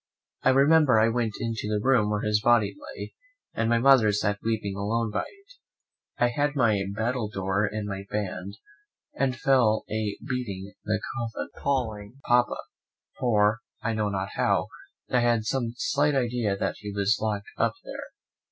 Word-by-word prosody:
I -, -, +3 dB
remember 140 Hz, -1 st, +5 dB
I 110 Hz, +1 st, +4 dB
went 115 Hz, -3 st, -1 dB
into 115 Hz, -2 st, -3 dB
the 105 Hz, 0 st, 0 dB
room 115 Hz, -2 st, +3 dB
where 105 Hz, 0 st, -1 dB
his 105 Hz, 0 st, +2 dB
body 120 Hz, -2 st, +3 dB, 0.2 s
lay, -, -, -7 dB, 0.4 s
and 115 Hz, 0 st, 0 dB
my 120 Hz, -, +4 dB
mother 120 Hz, -3 st, +6 dB
sat 105 Hz, 0 st, 0 dB
weeping 110 Hz, -3 st, -1 dB
alone 110 Hz, +3 st, -1 dB
by -, -, -1 dB
it. 400 Hz, +4 st, -20 dB, 0.6 s
I 120 Hz, -, +3 dB
had 145 Hz, +4 st, 0 dB
my 110 Hz, -7 st, +3 dB
battledore 105 Hz, -4 st, -1 dB
in 105 Hz, 0 st, -3 dB
my 100 Hz, -1 st, -5 dB
band, 100 Hz, -1 st, -4 dB, 0.6 s
and 130 Hz, -1 st, 0 dB
fell 120 Hz, -5 st, +3 dB
a 110 Hz, -1 st, -2 dB
beating 100 Hz, -7 st, -4 dB
the 110 Hz, -1 st, 0 dB, 0.2 s
coffin, 115 Hz, -2 st, -4 dB
and -, -, -15 dB
calling 120 Hz, -4 st, -2 dB
Papa; 120 Hz, 0 st, +3 dB, 0.6 s
for, 110 Hz, -2 st, +3 dB, 0.2 s
I 115 Hz, -, 0 dB
know 105 Hz, -1 st, 0 dB
not 95 Hz, -1 st, -2 dB
how, -, -, +1 dB, 0.4 s
I 125 Hz, -, +4 dB
had 120 Hz, -2 st, +2 dB
some 120 Hz, -1 st, -1 dB
slight 145 Hz, +2 st, +1 dB
idea 120 Hz, -6 st, 0 dB
that -, -, -2 dB
he 105 Hz, -, -6 dB
was 100 Hz, +2 st, +1 dB
locked 105 Hz, -2 st, -2 dB
up -, -, +2 dB
there. -, -, -7 dB
110 Hz, 165 wpm, -26 LUFS, 105-125 Hz, 0.6 s, mother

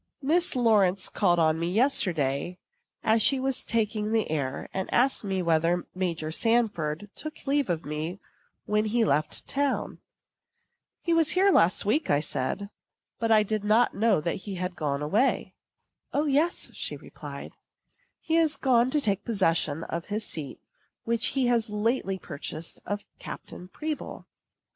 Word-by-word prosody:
Miss 335 Hz, +3 st, +3 dB
Lawrence 200 Hz, -6 st, +3 dB
called 175 Hz, -4 st, +2 dB
on 160 Hz, -1 st, +2 dB
me 170 Hz, +1 st, -1 dB
yesterday, 175 Hz, -, +1 dB, 0.5 s
as 220 Hz, +1 st, +3 dB
she 270 Hz, +4 st, +5 dB
was 265 Hz, 0 st, 0 dB
taking 215 Hz, -1 st, -1 dB
the 225 Hz, -7 st, 0 dB
air, 140 Hz, -3 st, -2 dB
and 190 Hz, 0 st, -3 dB
asked 255 Hz, +1 st, +2 dB
me 190 Hz, -2 st, -1 dB
whether 170 Hz, +1 st, +1 dB
Major 170 Hz, -4 st, -2 dB
Sanford 205 Hz, -5 st, 0 dB
took 310 Hz, 0 st, -8 dB
leave 280 Hz, -4 st, +1 dB
of 165 Hz, -2 st, -2 dB
me 155 Hz, +5 st, -4 dB, 0.5 s
when 210 Hz, +1 st, +1 dB
he 225 Hz, +1 st, +2 dB
left 155 Hz, -5 st, 0 dB
town. 280 Hz, 0 st, -1 dB, 1.0 s
"He 340 Hz, -, 0 dB
was 330 Hz, -2 st, +4 dB
here 390 Hz, +1 st, +5 dB
last 180 Hz, -, +3 dB
week," 295 Hz, +9 st, +1 dB, 0.2 s
said 145 Hz, +7 st, -2 dB
I, 200 Hz, -, -8 dB, 0.5 s
"but 230 Hz, -, 0 dB
I 215 Hz, -1 st, +5 dB
did 215 Hz, 0 st, -2 dB
not 220 Hz, +4 st, +3 dB
know 215 Hz, -4 st, +2 dB
that 170 Hz, +2 st, -2 dB
he 190 Hz, -1 st, -6 dB
was 180 Hz, 0 st, -2 dB
gone 150 Hz, -3 st, -2 dB
away." 215 Hz, -, +1 dB, 0.6 s
"O, 295 Hz, +2 st, +1 dB
yes," 300 Hz, +5 st, +1 dB
she -, -, -3 dB
replied, -, -, -9 dB, 0.7 s
"he 325 Hz, 0 st, 0 dB
is 320 Hz, -2 st, +3 dB
gone 245 Hz, -2 st, +3 dB
to 295 Hz, +2 st, +2 dB
take 200 Hz, -5 st, 0 dB
possession 165 Hz, -7 st, +1 dB
of 170 Hz, 0 st, -5 dB
his 210 Hz, +1 st, -2 dB
seat 145 Hz, -4 st, -5 dB, 0.4 s
which 230 Hz, 0 st, +1 dB
he 265 Hz, -, +3 dB
has 235 Hz, -2 st, +1 dB
lately 210 Hz, -2 st, 0 dB
purchased 155 Hz, -1 st, -7 dB
of 205 Hz, 0 st, -3 dB
Captain 180 Hz, -, -9 dB
Pribble. 305 Hz, +9 st, -5 dB
210 Hz, 155 wpm, -27 LUFS, 170-245 Hz, 1.0 s, she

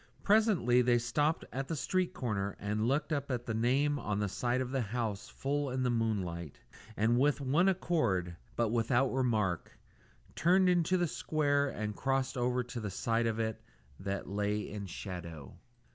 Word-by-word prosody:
Presently 200 Hz, -, +4 dB
they 120 Hz, -1 st, +4 dB
stopped 145 Hz, +7 st, 0 dB
at 135 Hz, +1 st, -3 dB
the 165 Hz, -, -2 dB
street 180 Hz, +6 st, 0 dB
corner 100 Hz, -6 st, -2 dB
and 105 Hz, +2 st, -1 dB
looked 145 Hz, +5 st, +1 dB
up 140 Hz, -1 st, -2 dB
at 125 Hz, -2 st, -2 dB
the 115 Hz, -, -2 dB
name 135 Hz, +6 st, +2 dB
on 105 Hz, -5 st, -2 dB
the 105 Hz, 0 st, 0 dB
side 120 Hz, +5 st, 0 dB
of 130 Hz, -1 st, -2 dB
the 135 Hz, -1 st, 0 dB
house 110 Hz, -2 st, -3 dB
full 145 Hz, +1 st, -2 dB
in 130 Hz, 0 st, -1 dB
the 125 Hz, -, +2 dB
moonlight, 95 Hz, -, -2 dB, 0.4 s
and 115 Hz, +3 st, +3 dB
with 145 Hz, +2 st, +3 dB
one 145 Hz, +8 st, +3 dB
accord, 115 Hz, -, 0 dB, 0.2 s
but 115 Hz, -2 st, +1 dB
without 120 Hz, +3 st, +2 dB
remark, 110 Hz, -9 st, 0 dB, 0.6 s
turned 185 Hz, +3 st, +4 dB
into 180 Hz, +1 st, +3 dB
the 175 Hz, -, +2 dB
square 145 Hz, -2 st, +1 dB
and 105 Hz, -3 st, -4 dB
crossed 135 Hz, 0 st, 0 dB
over 125 Hz, 0 st, +1 dB
to 125 Hz, 0 st, -6 dB
the 105 Hz, -2 st, -3 dB
side 115 Hz, +4 st, 0 dB
of 110 Hz, -1 st, -1 dB
it 110 Hz, -1 st, -2 dB, 0.4 s
that 100 Hz, 0 st, -3 dB
lay 105 Hz, +1 st, -1 dB
in 100 Hz, -1 st, -5 dB
shadow. 85 Hz, -7 st, -7 dB
120 Hz, 175 wpm, -32 LUFS, 105-140 Hz, 0.6 s, Presently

